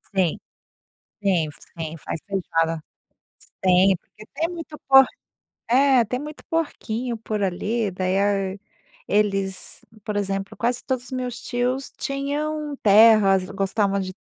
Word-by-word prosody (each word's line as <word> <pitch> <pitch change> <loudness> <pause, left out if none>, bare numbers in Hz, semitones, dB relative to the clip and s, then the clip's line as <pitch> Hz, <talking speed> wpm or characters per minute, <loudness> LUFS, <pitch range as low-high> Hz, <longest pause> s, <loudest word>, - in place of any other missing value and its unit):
Sim, 180 -4 +1 0.8
sim, 175 -6 +2 0.3
sim 160 0 -4
faz 160 - -5
feijoada, 165 -4 -1 0.6
sim, - - -21
tem 185 +1 +5
porque 215 +5 -17
tem 330 +2 0
muito 330 -3 -8
po 270 0 +9 0.7
eh, 260 -1 +5
tem 250 +4 -3
muito 300 +1 -8
porquinho, 245 -7 -2
por 215 -1 -3
ali, 205 +3 -1
daí 185 +1 -1
a 200 -1 0 0.5
eles, 195 -2 0 0.2
por 210 - -4
exemplo, 195 -1 -2
quase 240 +1 -1
todos 255 -1 -2
os - - -13
meus 250 -2 -4
tios 250 +2 -2
tinham 295 +2 -2
terras, 205 -3 +6
gostavam 200 0 0
de 185 -1 -4
210 Hz, 130 wpm, -23 LUFS, 190-255 Hz, 0.8 s, po